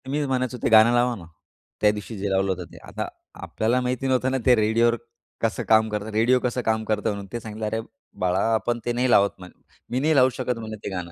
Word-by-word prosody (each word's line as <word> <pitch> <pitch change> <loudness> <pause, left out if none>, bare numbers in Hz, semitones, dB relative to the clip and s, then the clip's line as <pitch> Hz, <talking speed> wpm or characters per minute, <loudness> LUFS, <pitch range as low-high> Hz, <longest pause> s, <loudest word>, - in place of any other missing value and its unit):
तर - - -8
मीच 145 +1 0
म्हणायचो 130 -1 -1
ते - - +2
गाणं 110 +1 +7
लावा 120 0 +2
ना, 90 -6 -11 0.6
त्या 105 - +5
दिवशी 105 +1 -7
जे 100 +1 -2
लावलं 95 0 +1
होतं 90 -1 -4
ते. - - -13
आता - - -4 0.3
आपल्याला 120 +3 0
माहिती 125 +1 -2
नव्हतं 130 0 +1
ना 135 - +1
ते 125 - +6
रेडिओवर 115 +2 +2 0.5
कसं 115 -2 -1
काम 110 0 +5
करतं, 105 0 -4
रेडिओ 115 +4 +3
कसं 125 0 -2
काम 110 -1 0
करतं 110 0 0
म्हणून 100 -1 -4
ते. 120 - -2
सांगितलं 110 -1 -6
"अरे 110 +1 -1 0.4
बाळा 90 +1 +2
आपण 120 +2 0
ते 120 - 0
नाही 125 +1 0
लावत" 100 -4 +5
म्ह 90 - -10 0.4
"मी 125 - -1
नाही 155 +3 +2
लावू 130 -1 +6
शकत 125 -2 -2
म्हणे 110 -1 -6
ते - - -3
गाणं. 90 -1 -5
115 Hz, 240 wpm, -24 LUFS, 105-125 Hz, 0.6 s, गाणं